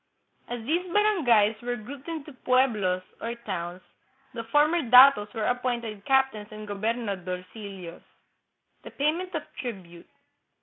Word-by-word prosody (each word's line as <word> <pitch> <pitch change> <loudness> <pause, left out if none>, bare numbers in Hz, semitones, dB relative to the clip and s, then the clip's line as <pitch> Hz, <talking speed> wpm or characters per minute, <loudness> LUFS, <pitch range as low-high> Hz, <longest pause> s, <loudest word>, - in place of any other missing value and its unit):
As 240 -2 -6
these 345 +6 -1
barangayes 245 - +3
were 245 0 -2
grouped 255 +6 -10
into 315 -3 -6
pueblos, 230 -9 +1 0.2
or 230 +1 -3
towns, 185 -5 -5 0.5
the 230 -2 -5
former 300 +8 +3
datos 250 -4 +7
were 220 -1 -1
appointed 240 -4 -2
captains 265 -6 +2
and 215 0 -9
goberna 215 +1 -2
dorcillos. 185 -1 -7 0.8
The - - -10
Payment 335 +5 -1
of 310 - -2 0.2
Tribute. 185 -8 -8
235 Hz, 125 wpm, -27 LUFS, 205-275 Hz, 0.8 s, datos